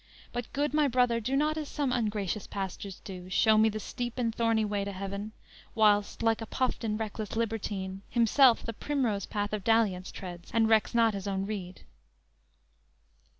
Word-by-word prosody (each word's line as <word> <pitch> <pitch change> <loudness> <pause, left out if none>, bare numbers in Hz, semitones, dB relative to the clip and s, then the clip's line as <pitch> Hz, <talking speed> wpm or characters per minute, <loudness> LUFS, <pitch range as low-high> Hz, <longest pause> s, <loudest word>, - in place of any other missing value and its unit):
But, 245 -1 -4
good 290 0 -1
my 300 -1 +4
brother 245 -2 +2
Do 255 +4 -1
not 305 +2 +1
as 305 -2 -4
some 285 -4 -1
ungracious 210 -5 -1
pastors 195 0 -5
do, 185 -2 -8
Show 220 +4 +4
me 220 +1 +5
the 215 0 -4
steep 240 +3 -5
and 230 -3 0
thorny 230 -1 +2
way 205 -1 -1
to 200 - -4
heaven, 200 +2 -5 0.4
Whilst, 210 -1 +3
like 225 0 +2
a 225 - -5
puffed 255 +1 -1
and 215 -1 -1
wreckless 215 -1 -4
libertine, 205 -4 -2
Himself 240 +1 +5
the 230 - -3
primrose 235 -7 -1
path 205 0 -2
of 210 -2 -2
dalliance 205 -5 +2
treads 175 -2 -8
And 225 -1 +4
recks 220 +1 +3
not 230 -2 +4
his 200 0 -5
own 195 -1 -1
read!" 190 -3 -6
220 Hz, 180 wpm, -29 LUFS, 200-235 Hz, 0.4 s, me